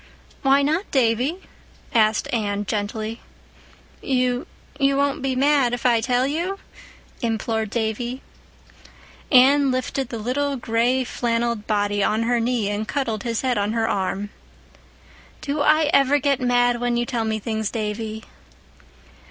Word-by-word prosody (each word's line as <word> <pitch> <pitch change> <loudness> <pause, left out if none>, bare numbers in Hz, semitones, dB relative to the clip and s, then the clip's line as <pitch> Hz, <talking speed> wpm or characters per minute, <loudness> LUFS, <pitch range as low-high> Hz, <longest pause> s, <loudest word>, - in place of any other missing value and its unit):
"Why 275 0 +4
not, 320 +7 0
Davy?" 260 +7 +1 0.5
asked 220 -1 +3
Anne 205 -3 -1
gently. 215 +2 -3 0.8
"You—you 270 +2 -1
won't 280 0 0
be 265 -1 -1
mad 275 -2 +3
if 245 - -10
I 235 -2 +4
tell 250 +2 +1
you?" 340 +8 -2 0.6
implored 225 -2 -1
Davy. 235 +3 -3 1.1
Anne 275 +1 +6
lifted 255 0 -2
the 230 - -5
little 275 +6 -1
gray 240 +2 +1
flannelled 235 -2 -2
body 205 -1 +1
on 215 +3 +1
her 240 +1 +1
knee 230 -2 0
and 210 +1 -3
cuddled 230 -6 -2
his 230 0 -2
head 255 -4 0
on 205 +2 -1
her 225 -1 0
arm. 195 +1 -2 1.1
"Do 290 0 -2
I 305 0 +3
ever 275 +1 +4
get 280 -1 0
'mad' 245 -1 +2
when 245 -1 0
you 240 - 0
tell 235 -2 -2
me 220 0 -1
things, 220 0 -2
Davy?" 220 0 -4
240 Hz, 135 wpm, -22 LUFS, 220-270 Hz, 1.1 s, Anne